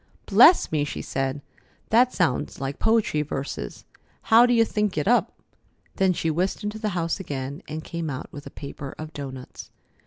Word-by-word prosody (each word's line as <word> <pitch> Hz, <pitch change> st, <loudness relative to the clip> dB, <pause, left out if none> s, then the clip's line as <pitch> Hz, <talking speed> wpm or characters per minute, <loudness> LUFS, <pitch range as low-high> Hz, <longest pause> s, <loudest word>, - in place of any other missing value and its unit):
"Bless 250 Hz, -, +6 dB
me!" 150 Hz, -2 st, +1 dB
she 145 Hz, -, -5 dB
said. 135 Hz, +1 st, -2 dB, 0.5 s
"That 245 Hz, +3 st, +5 dB
sounds 165 Hz, -, -1 dB
like 135 Hz, +1 st, -4 dB
poetry 220 Hz, -9 st, +2 dB
verses. 140 Hz, -1 st, -5 dB, 0.4 s
How 235 Hz, +2 st, +6 dB
do 245 Hz, -, +3 dB
you 230 Hz, -1 st, +5 dB
think 210 Hz, -4 st, -1 dB
it 150 Hz, -, 0 dB
up?" 245 Hz, +2 st, +2 dB, 0.6 s
Then 190 Hz, -1 st, +3 dB
she 165 Hz, -2 st, -1 dB
whisked 185 Hz, +6 st, -1 dB
into 210 Hz, +1 st, -4 dB
the 215 Hz, -1 st, -1 dB
house 165 Hz, +3 st, -1 dB
again 140 Hz, -5 st, -5 dB
and 155 Hz, +1 st, -5 dB
came 170 Hz, -2 st, -4 dB
out 130 Hz, -2 st, -6 dB
with 145 Hz, -1 st, -9 dB
a -, -, -7 dB
paper 140 Hz, -1 st, -8 dB
of 155 Hz, 0 st, -8 dB
doughnuts. 130 Hz, -3 st, -8 dB
160 Hz, 180 wpm, -25 LUFS, 140-210 Hz, 0.6 s, Bless